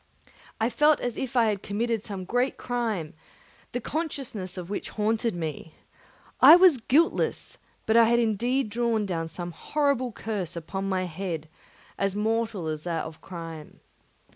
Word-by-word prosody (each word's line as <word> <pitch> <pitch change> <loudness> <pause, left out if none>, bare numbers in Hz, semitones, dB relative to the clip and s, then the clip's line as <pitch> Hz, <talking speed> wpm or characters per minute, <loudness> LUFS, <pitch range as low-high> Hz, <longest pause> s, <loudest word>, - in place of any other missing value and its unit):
I 225 +2 +1
felt 295 +6 +4
as 245 -2 -3
if 260 0 -4
I 235 - +5
had 205 -2 -2
committed 225 +2 -1
some 195 -3 -6
great 245 +6 0
crime, 225 -10 -2 0.6
the 245 - -2
consciousness 250 - -4
of 180 -2 -5
which 200 - -4
haunted 220 0 0
me. 160 -1 -5 0.6
I - - +11
was 355 -5 +7
guiltless, 290 +9 +1 0.3
but 220 - +2
I 230 0 +8
had 235 +1 +3
indeed 235 +2 +1
drawn 230 -2 +1
down 165 -4 -2
a 175 - -3
horrible 275 - 0
curse 205 -6 -4
upon 190 +4 -4
my 185 -1 0
head, 170 -2 -4 0.5
as 195 0 0
mortal 220 -3 -1
as 155 -1 -3
that 170 -2 -2
of 160 0 -10
crime. 165 -4 -9
215 Hz, 155 wpm, -27 LUFS, 180-240 Hz, 0.6 s, I